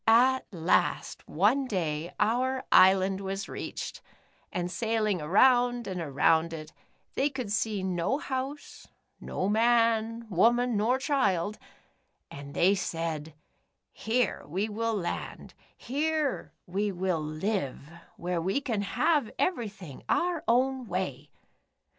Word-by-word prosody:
At 255 +4 +5
last, 170 -4 0
one 225 - +2
day 165 -5 -2
our 255 +4 +1
island 190 +1 +5
was 195 0 -4
reached, - - -6 0.5
and 180 0 -3
sailing 215 -2 0
around 245 +8 +4
and 185 -3 -4
around 160 +2 +2
it, 155 -1 -8 0.4
they 280 - +1
could 255 -7 -5
see 210 -2 0
no 185 +7 0
house, 275 0 -5 0.3
no 185 - -3
man, 230 +1 +2
wo 210 +3 +4
man, 245 0 0
nor 225 +5 +2
child, 215 - 0 0.7
and 140 0 -9
they 185 +3 +4
said: 165 -5 -3 0.3
' - - -51
Here 230 -1 0
we 190 +7 -1
will 225 +1 -1
land, 180 -4 -5 0.2
here 300 +2 -1
we 200 +3 -1
will 180 -3 -1
live, 155 -3 -3 0.3
where 175 -1 -2
we 190 +10 0
can 235 -7 -2
have 285 - +1
everything 210 - -3
our 345 -2 +1
own 255 +1 +2
way.' 160 -7 -3
210 Hz, 125 wpm, -28 LUFS, 175-245 Hz, 0.7 s, At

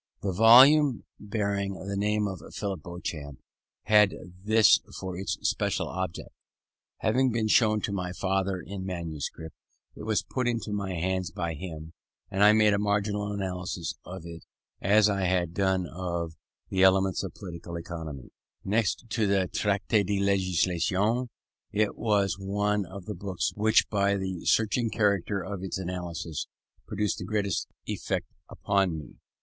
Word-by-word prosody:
The 100 - 0
volume 125 +6 +7 0.2
bearing 100 -2 -2
the 100 +2 -5
name 105 +1 +1
of 95 -2 -6
Philip 100 -5 -3
Beauchamp 75 -5 -6 0.5
had 105 -2 +5 0.3
this 110 -1 +6 0.2
for 95 -2 -5
its 95 +2 -2
special - - 0
object. 95 -2 -4 0.7
Having 130 +4 +2
been 115 -1 0
shown 110 -1 +4
to - - -2
my 90 -2 -3
father 95 0 -1
in 95 +1 -7
manuscript, 80 -3 -5 0.4
it - - -10
was 110 -1 0
put 130 -2 -2
into 115 -3 -2
my 100 -3 -2
hands 95 +1 -1
by 85 0 -3
him, 80 0 -8 0.4
and 95 +1 +2
I 105 - +8
made 110 -1 +5
a 100 - +1
marginal 105 0 0
analysis 90 -6 -3
of 90 -1 -8
it 85 -1 -9 0.4
as 105 +2 +5
I 100 -2 0
had 90 -2 +1
done 95 -1 +1
of 85 -2 -4 0.4
the 95 - 0
Elements 95 -1 +4
of - - -6
Political 85 -1 -8
Economy. 80 -5 -7 0.3
Next 110 +3 0
to 110 -1 0
the 95 -2 +1
Traité 105 +1 +1
de 100 +1 -1
Législation_, 95 - +1 0.4
it 105 0 +1
was 100 -3 +1
one 105 0 0
of 95 +1 -9
the 105 - -4
books 95 -1 -2
which 110 +1 +3
by 100 -1 +1
the 95 -3 -4
searching 115 +1 +2
character 100 -2 +1
of 95 0 -5
its 95 0 -3
analysis 85 -3 -4 0.4
produced 105 -1 -1
the - - -5
greatest 100 -4 -1 0.2
effect - - -2 0.2
upon 95 -4 0
me. 75 - -10
95 Hz, 150 wpm, -28 LUFS, 90-105 Hz, 0.7 s, I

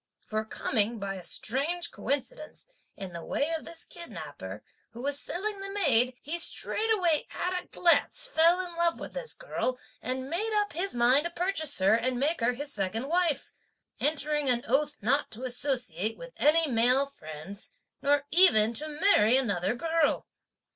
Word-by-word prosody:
for 215 0 -2
coming, 220 0 0
by 200 -2 -4
a 185 -2 -8
strange 300 - -2
coincidence, 285 +2 -4 0.3
in 190 -3 -7
the 170 -1 -6
way 305 +4 -1
of 320 - -4
this 335 -1 -11
kidnapper, 340 -1 -9 0.3
who 235 - -8
was 285 0 -2
selling 405 +3 -4
the 390 - -5
maid, 255 - +2
he 325 +5 -3
straightway 370 -3 +1
at 360 0 -2
a - - -26
glance 345 +6 +2
fell 345 -6 +4
in 345 -1 -10
love 340 0 +1
with - - -8
this - - -4
girl, 255 - -2 0.2
and 260 +2 -3
made 405 +9 -2
up 410 -4 -2
his 355 0 -2
mind 250 +6 +4
to - - -1
purchase 340 -4 0
her 190 +2 +4
and 245 +2 +1
make 305 +5 +1
her 240 +2 +2
his 285 +3 -7
second 210 +7 -2
wife; 335 -5 0 0.5
entering 295 -1 0
an 240 -1 +2
oath 290 +5 +1
not 275 +7 +1
to 220 +3 -8
associate 245 - -2
with - - -10
any 320 +3 +4
male 250 +2 +4
friends, 195 - -6 0.3
nor 285 0 +2
even 235 - +6
to 300 +7 -4
marry 255 - +5
another 205 -5 0
girl. 325 +3 +1
285 Hz, 170 wpm, -29 LUFS, 235-340 Hz, 0.5 s, even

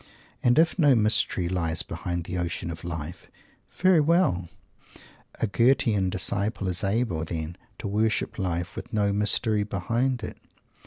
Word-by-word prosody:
And 120 0 +3
if 165 +3 +3
no 145 -5 +6
"mystery" 105 -5 +2
lies 85 -3 -1
behind 85 -1 -4
the 90 +2 -6
ocean 85 0 -3
of 80 - -8
life, 85 -1 -6 0.4
very 185 -2 +4
well! 150 - +2 0.9
A - - +2
Goethean 110 -3 +2
disciple 100 +2 -1
is 90 +1 0
able, 100 -5 0
then, 80 0 -4 0.2
to - - -5
worship 110 +2 0
Life, 90 0 -2
with - - -7
no 100 -2 +1
mystery 105 +1 +1
behind 115 +6 -1
it! - - -6
100 Hz, 145 wpm, -26 LUFS, 85-115 Hz, 0.9 s, no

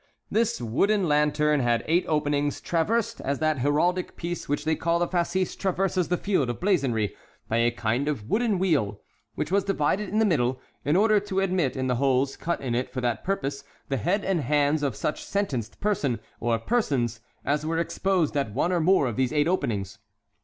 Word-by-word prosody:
This 230 +1 +1
wooden 185 - +1
lantern 150 0 +2
had 120 -2 +1
eight 170 +3 +2
openings, 145 -2 0
traversed, 205 +7 0
as 140 +1 -1
that 155 -2 0
heraldic 170 +7 +1
piece 175 -3 -5
which 145 +1 -1
they 160 0 +2
call 170 +1 +1
the 175 0 +1
fascis 180 +1 0
traverses 185 -2 0
the 180 - +1
field 175 -12 0
of 120 - -4
blazonry, 135 - +1 0.3
by 115 - 0
a 115 0 +4
kind 120 +3 -1
of 130 -9 -2
wooden 220 - +1
wheel, 140 - +1 0.4
which 155 - -3
was 200 0 +3
divided 195 +2 0
in 210 - -1
the 220 - +4
middle, 130 - +1 0.2
in 145 +3 +1
order 215 +2 +4
to 195 -1 -2
admit 180 -9 0
in 130 - -1
the 125 -2 0
holes 135 0 +1
cut 170 - -3
in 130 -3 -2
it 125 +2 -1
for 130 - -3
that 120 -2 -1
purpose 140 -7 -2 0.3
the 135 - 0
head 195 - 0
and 185 -4 +1
hands 145 +2 +2
of 140 -3 -1
such 150 - -3
sentenced 135 - -3
person 150 - 0 0.2
or 115 -1 +1
persons 120 - 0 0.3
as 145 +2 +1
were 165 +1 -1
exposed 170 -1 0
at 135 -7 -1
one 165 +6 +1
or 180 - +2
more 170 -2 +4
of 120 -3 -3
these 130 -2 +1
eight 150 0 +2
openings. 100 - -1
150 Hz, 195 wpm, -26 LUFS, 130-185 Hz, 0.4 s, a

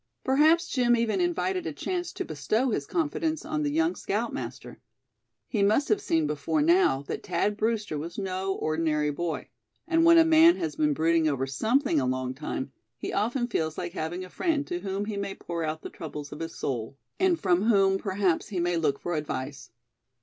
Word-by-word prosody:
Perhaps 310 +5 +4
Jim 245 -2 +3
even 230 +8 0
invited 360 +1 0
a - - -2
chance 355 -1 -3
to - - -4
bestow 215 - 0
his - - -2
confidence 320 -1 -1
on 305 -1 -2
the 295 - 0
young 330 +4 +1
scoutmaster. - - -4 0.7
He 215 - -1
must 215 +8 +3
have 415 -1 +2
seen 160 - +1
before 150 - 0
now 335 - +3
that - - -5
Thad 210 0 0
Brewster 215 -7 -1
was 170 +3 -7
no 190 -1 -2
ordinary 155 -1 0
boy; 160 -1 -4 0.4
and 330 -1 +3
when 335 0 +7
a 330 - +7
man 325 +1 +7
has 155 -2 -3
been 150 -1 +1
brooding 160 +1 +2
over 135 -3 0
something 220 - +1
a 130 - 0
long 130 0 -1
time, 135 -1 -5 0.3
he - - -5
often 240 +5 0
feels 160 -9 -2
like 175 -1 -4
having 175 +1 -4
a - - -13
friend 320 -5 0
to 355 -1 -3
whom 195 - -3
he 210 -1 -4
may 200 -1 -3
pour 170 -1 -4
out 155 0 -3
the - - -5
troubles 150 -2 -7
of 150 - -8
his 165 0 -5
soul, 125 0 -4 0.2
and 370 -3 +3
from 185 +1 +2
whom 195 -4 +4
perhaps 190 -4 0
he 190 -4 -3
may 175 0 +1
look 150 -4 +1
for 175 - -3
advice. 145 -3 -4
195 Hz, 195 wpm, -27 LUFS, -, 0.7 s, when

